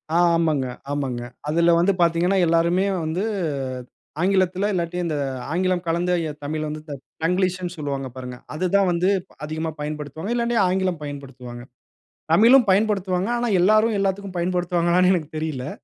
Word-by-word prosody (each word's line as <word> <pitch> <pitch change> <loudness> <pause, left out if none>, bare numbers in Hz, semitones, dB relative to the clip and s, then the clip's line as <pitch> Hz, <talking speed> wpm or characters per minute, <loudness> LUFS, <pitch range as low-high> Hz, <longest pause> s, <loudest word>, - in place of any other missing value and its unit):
ஆ - - +5 0.2
ஆமாங்க, 155 -5 +1 0.3
ஆமாங்க. 130 -4 -2 0.3
அதில 170 +3 +3
வந்து 180 +4 +4
பாத்தீங்கன்னா, 170 +3 +2
எல்லாருமே 170 +3 +2 0.2
வந்து, 170 +6 -2 1.0
ஆங்கிலத்தில, 190 +1 +2
இல்லாட்டி 175 0 -2
இந்த 155 - -2 0.4
ஆங்கிலம் 185 0 0
கலந்த 170 +2 0 0.2
எ - - -3
தமிழ்ல 155 +1 -3
வந்து 155 0 -6 0.4
தங்கிலீஷ்ன்னு 180 0 0
சொல்லுவாங்க 140 -2 -3
பாருங்க. 125 -1 -7 0.2
அது 175 +4 -2
தான் 195 -2 +4
வந்து 175 +2 +1
இப்ப 185 - -24
அதிகமா 160 +1 -3
பயன்படுத்துவாங்க. 150 - -5
இல்லாட்டி 235 0 0
ஆங்கிலம் 185 -3 0
பயன்படுத்துவாங்க. 130 -4 -8 0.7
தமிழும் 235 +6 +6
பயன்படுத்துவாங்க. 195 -2 +1
ஆனா 240 0 -1
எல்லாரும் 215 +3 +4
எல்லாத்துக்கும் 195 -1 -2
பயன்படுத்துவாங்களான்னு 175 0 +2
எனக்கு 155 -4 -3
தெரியலை. 150 -3 -3
175 Hz, 135 wpm, -23 LUFS, 155-190 Hz, 1.0 s, தமிழும்